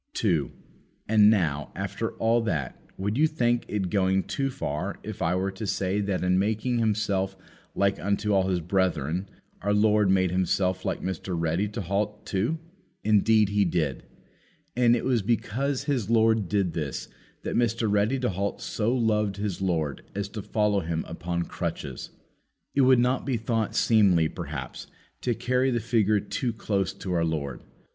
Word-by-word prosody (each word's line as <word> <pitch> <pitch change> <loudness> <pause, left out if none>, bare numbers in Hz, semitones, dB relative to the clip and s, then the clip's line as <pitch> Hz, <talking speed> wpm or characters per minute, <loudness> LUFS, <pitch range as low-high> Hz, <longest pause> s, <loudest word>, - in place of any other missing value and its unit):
2. - - +1 0.6
And 105 -1 +6
now, 80 -9 +1
after - - -3
all 115 +1 +2
that, 80 - -3 0.2
would 105 +6 -1
you 160 - +5
think 120 -6 0
it 95 -4 -2
going 95 -1 +2
too 135 -1 -2
far 75 - -3
if - - -7
I 85 +2 +1
were 95 +1 0
to 100 +2 -6
say 95 +1 0
that 100 -2 -1
in 90 0 +3
making 110 +4 0
Himself 100 -3 0 0.4
like 100 0 +1
unto 100 +1 0
all 95 -1 +3
His 90 -2 0
brethren, 90 -1 0 0.3
our 100 +2 +1
Lord 105 -1 +4
made 95 -2 +3
Himself 95 0 0
like - - -2
Mr. 95 0 -3
Ready 85 +5 0
to 105 +2 -5
halt 105 +3 -2
too? 110 +12 0 0.5
Indeed 110 0 +4
He 100 0 +2
did. 80 -8 0 0.7
And 120 -1 +4
it 120 - -2
was 125 -4 +2
because 120 +6 -1
his 125 -8 -1
Lord 110 -4 +3
did 100 -4 +1
this, 75 -4 -4 0.4
that - - -3
Mr. 115 -1 +1
Ready 105 +5 +2
to 125 - +1
halt 100 +2 -2
so 110 +1 -1
loved 105 -4 +1
his 100 -3 -3
Lord 80 -7 -1
as 100 0 -2
to 105 +1 -6
follow 105 0 +1
Him 80 -2 -3
upon 85 +1 -3
crutches. 65 -5 -5 0.6
It 140 - +3
would 130 -1 +6
not 125 +2 +2
be 130 -3 0
thought 115 -1 -1
seemly, 95 -8 +4
perhaps, 70 -4 -6 0.3
to 120 -2 0
carry 125 +2 +1
the 120 -2 +1
figure 110 -2 +2
too 120 +4 -2
close 100 -3 -1
to 95 - -4
our 85 -1 +2
Lord. 75 -5 -2
100 Hz, 170 wpm, -26 LUFS, 90-115 Hz, 0.7 s, And